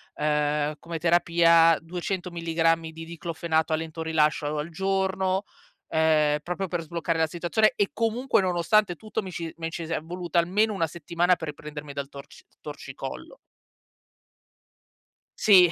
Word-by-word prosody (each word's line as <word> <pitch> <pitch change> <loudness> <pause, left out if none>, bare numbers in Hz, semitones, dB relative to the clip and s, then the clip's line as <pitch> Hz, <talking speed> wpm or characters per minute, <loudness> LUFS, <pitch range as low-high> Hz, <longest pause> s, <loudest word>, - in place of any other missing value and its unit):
ehm, 150 0 0
come 170 -1 -5
terapia, 170 -1 +5
200 180 +2 -4
milligrammi 165 -1 +1
di 165 0 -9
Diclofenac 165 -1 -2
a - - +4
lento 160 0 -5
rilascio 155 -2 +1
al 150 +3 -3
giorno, 190 +1 0 0.5
ehm, 155 -2 +3
proprio 180 +4 -3
per 175 -1 -2
sbloccare 165 0 -2
la 160 - +3
situazione 175 +6 +1
e 205 - +1
comunque, 230 +2 +1
nonostante 185 +2 +2
tutto, 215 +4 -4
mi 190 -2 -7
ci 165 -2 -5
mi 165 0 -3
ci 165 0 -5
si 165 - -3
è - - -1
voluta 175 +1 -1
almeno 205 +6 +2
una 170 -5 0
settimana 170 +2 +1
per 160 -3 -6
riprendermi 150 0 -8
dal 140 0 -5
torci 140 -1 -12 0.2
torcicollo. - - -8 2.0
Sì. 185 -5 +7
170 Hz, 145 wpm, -26 LUFS, 160-180 Hz, 2.0 s, Sì